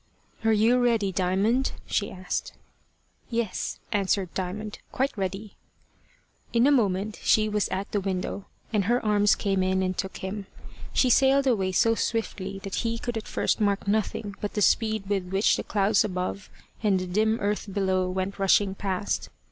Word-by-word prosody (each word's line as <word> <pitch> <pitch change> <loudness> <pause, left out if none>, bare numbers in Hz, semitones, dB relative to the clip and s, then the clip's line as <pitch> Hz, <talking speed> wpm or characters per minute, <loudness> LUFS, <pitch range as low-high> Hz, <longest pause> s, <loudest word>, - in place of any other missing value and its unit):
"Are 225 - +3
you 225 +3 +4
ready, 225 -5 +2
Diamond?" 195 +8 +1
she 205 - -1
asked. 185 -1 -4 0.8
"Yes," 230 -4 -2
answered 195 -3 0
Diamond, 205 +3 -4
"quite 265 +2 -1
ready." 195 +1 -4 1.0
In 235 +1 +4
a 290 - +5
moment 210 -5 +1
she 215 0 +3
was 210 -2 0
at 195 +2 -3
the 205 - 0
window, 190 +1 -3 0.3
and 205 -3 +2
her 240 +2 +1
arms 205 -1 +4
came 195 -2 0
in 190 0 +1
and 185 0 -1
took 190 +1 -4
him. 195 +1 -5 0.4
She 255 - +3
sailed 270 +2 +4
away 200 -8 +2
so 225 +4 +3
swiftly 205 -4 -2
that 195 - -4
he 230 0 -1
could 240 0 -4
at 220 - -4
first - - 0
mark 200 -1 +1
nothing 205 0 -1
but 205 - -4
the 210 - 0
speed 220 -2 +2
with 195 -2 0
which 195 +3 +3
the - - -3
clouds 200 0 +2
above 185 0 -3 0.3
and 200 -4 +2
the 185 - -3
dim 220 +5 +1
earth 205 0 -2
below 190 -2 +1
went 190 +2 -3
rushing 195 0 +3
past. 195 0 -2
205 Hz, 170 wpm, -26 LUFS, 190-220 Hz, 1.0 s, a